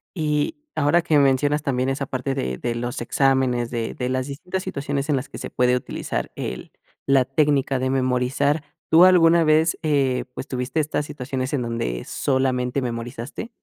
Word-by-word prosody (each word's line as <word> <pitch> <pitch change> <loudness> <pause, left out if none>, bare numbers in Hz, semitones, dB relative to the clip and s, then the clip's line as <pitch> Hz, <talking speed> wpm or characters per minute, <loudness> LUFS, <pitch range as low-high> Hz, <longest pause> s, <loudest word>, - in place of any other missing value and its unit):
Y 150 - 0 0.2
ahora 155 +3 +3
que 155 -2 +2
mencionas 145 +2 +2
también 130 -2 0
esa 135 +1 -2
parte 130 +1 -3
de 65 - -2
de 120 -1 -3
los 120 +1 -4
exámenes, 130 -1 +1
de 115 -2 -3
de 125 0 -3
las 130 0 -1
distintas 180 +7 -4
situaciones 140 +1 -3
en 150 - +3
las 135 +1 -3
que - - -9
se - - -6
puede 125 0 +2
utilizar 125 - -4
el - - -6 0.3
la 135 -1 +4
técnica 140 -1 +1
de 130 +1 0
memorizar, 130 +3 +1 0.3
¿tú 170 +3 +8
alguna 170 -2 +5
vez, 155 +2 +3
eh, 140 -5 +1
pues, - - -6
tuviste 130 +3 -2
estas 150 0 -2
situaciones 130 -2 -4
en 140 - 0
donde 115 - -3
solamente 130 -1 0
memorizaste? 120 - -5
135 Hz, 170 wpm, -23 LUFS, 125-150 Hz, 0.3 s, tú